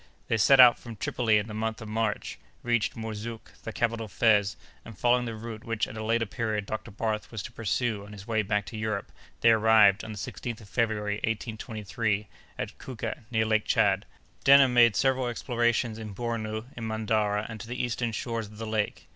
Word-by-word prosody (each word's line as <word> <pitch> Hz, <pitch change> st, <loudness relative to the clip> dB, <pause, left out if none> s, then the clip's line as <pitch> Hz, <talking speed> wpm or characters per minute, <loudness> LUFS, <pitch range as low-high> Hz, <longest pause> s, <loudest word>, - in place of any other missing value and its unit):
They 115 Hz, -, +2 dB
set 130 Hz, +5 st, +5 dB
out 125 Hz, -2 st, +9 dB
from 115 Hz, -2 st, -9 dB
Tripoli 110 Hz, +1 st, +1 dB
in 105 Hz, -, 0 dB
the 110 Hz, -, -7 dB
month 110 Hz, +1 st, -2 dB
of 110 Hz, -, -8 dB
March, 110 Hz, -1 st, -2 dB, 0.2 s
reached 120 Hz, -2 st, +1 dB
Mourzouk, 110 Hz, 0 st, -6 dB
the 115 Hz, -, -6 dB
capital 115 Hz, 0 st, -1 dB
of -, -, -18 dB
Fez, 105 Hz, -2 st, +3 dB, 0.3 s
and, 115 Hz, -4 st, -11 dB
following 125 Hz, +2 st, +3 dB
the 115 Hz, -1 st, -4 dB
route 110 Hz, 0 st, -7 dB
which 115 Hz, -1 st, -1 dB
at -, -, -9 dB
a 110 Hz, -, -5 dB
later 115 Hz, +1 st, +1 dB
period 105 Hz, -1 st, -2 dB
Dr. 110 Hz, +2 st, -5 dB
Barth 110 Hz, 0 st, -3 dB
was 110 Hz, -4 st, -5 dB
to -, -, -7 dB
pursue 115 Hz, -1 st, -1 dB
on 100 Hz, -, -12 dB
his 100 Hz, -2 st, -10 dB
way 110 Hz, -1 st, +1 dB
back 105 Hz, 0 st, -1 dB
to 115 Hz, -, -7 dB
Europe, 110 Hz, -2 st, -3 dB, 0.3 s
they 115 Hz, -, +6 dB
arrived, 110 Hz, -2 st, +5 dB
on 110 Hz, -, -6 dB
the 105 Hz, -, -7 dB
16th 115 Hz, +3 st, -5 dB
of 100 Hz, -, -14 dB
February, 105 Hz, -3 st, 0 dB
1823, 110 Hz, -1 st, -2 dB, 0.3 s
at -, -, -5 dB
Kouka, 115 Hz, -1 st, -6 dB
near 110 Hz, -2 st, +1 dB
Lake 110 Hz, -1 st, +1 dB
Tchad. -, -, +3 dB, 0.4 s
Denham 135 Hz, -2 st, +7 dB
made 120 Hz, -3 st, +6 dB
several 130 Hz, +6 st, +2 dB
explorations 120 Hz, -1 st, 0 dB
in 105 Hz, -3 st, -7 dB
Bornou, 110 Hz, -1 st, -3 dB
in 115 Hz, -1 st, -5 dB
Mandara, 110 Hz, -1 st, 0 dB
and 110 Hz, -1 st, -8 dB
to 115 Hz, -, -8 dB
the 125 Hz, +1 st, -5 dB
eastern 120 Hz, -1 st, -1 dB
shores 115 Hz, 0 st, -3 dB
of 105 Hz, +1 st, -14 dB
the 115 Hz, -, -5 dB
lake. 110 Hz, -1 st, -2 dB
110 Hz, 205 wpm, -28 LUFS, 105-115 Hz, 0.4 s, out